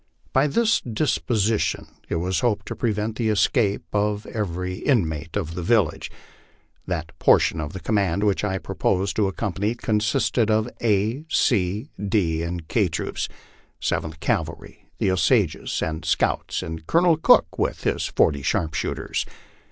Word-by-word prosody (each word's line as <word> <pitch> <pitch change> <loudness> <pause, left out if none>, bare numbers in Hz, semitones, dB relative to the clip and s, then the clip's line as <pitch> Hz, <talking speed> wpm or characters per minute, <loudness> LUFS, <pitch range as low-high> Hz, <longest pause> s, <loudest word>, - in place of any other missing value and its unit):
By 135 +3 +4
this 225 +10 +2
disposition 115 -3 0 0.2
.it - - -1
was 90 +3 0
hoped 120 -4 0
to - - -4
prevent 110 -1 -1
the 115 -2 0
escape 105 0 +2
of 105 0 0
every 90 -3 -3
inmate 80 - 0
of 85 -5 -3
the 90 - -4
village. 100 -2 +1 0.8
That 85 -3 -3
por - - +6
tion 80 - -1
of 75 0 -5
the 95 - -5
command 100 0 0
which 105 -1 +1
I 95 -2 0
proposed 95 +1 -1
to 105 -2 +3
accompany 100 +2 -2
consisted 110 0 +1
of 110 +1 +2
A, 110 +4 +1
C, 105 - +1
D, 95 -6 +1
and 85 -1 -4
K 105 0 +2
troops, 80 -1 -3 0.5
Seventh 80 0 -2
Cavalry, - - -3
the 95 - +1
Osages 95 - +1
and 80 0 -3
scouts, - - 0
and 80 0 -7
Colonel 170 0 +4
Cook 160 - +4
with - - -1
his - - 0
forty 70 -2 +2
sharpshooters. 80 +2 -1
100 Hz, 145 wpm, -23 LUFS, 85-110 Hz, 0.8 s, por